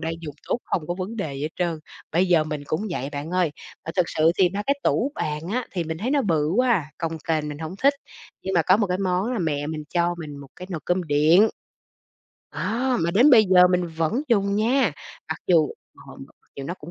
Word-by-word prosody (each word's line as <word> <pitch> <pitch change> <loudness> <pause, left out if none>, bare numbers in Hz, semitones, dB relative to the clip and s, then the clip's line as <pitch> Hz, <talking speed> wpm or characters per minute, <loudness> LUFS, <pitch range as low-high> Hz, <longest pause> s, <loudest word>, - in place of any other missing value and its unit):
đang 165 0 -2
dùng 150 -4 -7
tốt, - - +1
hông 160 -5 -2
có 175 - -2
vấn 190 +5 -5
đề 160 -10 -3
gì 135 - -6
hết 150 - -1
trơn. 170 -3 -1 0.3
Bây 180 +3 +3
giờ 170 -3 +4
mình 150 -2 -4
cũng 175 +9 -2
vậy 135 -5 -3
bạn 145 +3 -5
ơi, 180 -3 +1 0.3
ờ, 165 - -6
thực 180 -2 +3
sự 160 +1 +3
thì 185 -2 +5
ba 200 +3 -3
cái 280 +1 +1
tủ 275 +5 +1
bàn 150 0 -2
á 250 +1 -1
thì 175 -3 -2
mình 160 0 -4
thấy 230 +8 -2
nó 285 -1 +2
bự 160 -8 +1
quá 250 0 +3
à, 185 -9 +1
cồng 165 -2 -3
kềnh 155 -2 0
mình 145 -1 -6
hổng 160 +3 -6
thích. 280 +1 +5 0.5
Nhưng 190 - -3
mà 170 - +4
có 185 - +5
một 210 -1 +1
cái 180 0 -1
món 190 +4 0
là 245 - -1
mẹ 145 -5 -1
mình 155 0 -5
cho 175 0 +2
mình 150 -3 -7
một 140 -1 -11
cái 180 - -8
nồi 170 -4 -4
cơm 180 +1 +1
điện, 160 +7 +5 1.1
đó, 250 +2 0
mà 165 +1 +1
đến 245 +11 +5
bây 225 -4 +7
giờ 180 -2 +6
mình 180 -1 +1
vẫn 165 - -1
dùng 200 -3 +2
nha, 235 - +2 0.4
mặc 160 - -3
dù 165 -5 +4 0.4
ờ, - - -11
mặc - - -12 0.2
dù 140 - -6
nó 175 +6 -4
cũng 155 -2 -11
175 Hz, 250 wpm, -24 LUFS, 155-200 Hz, 1.1 s, bây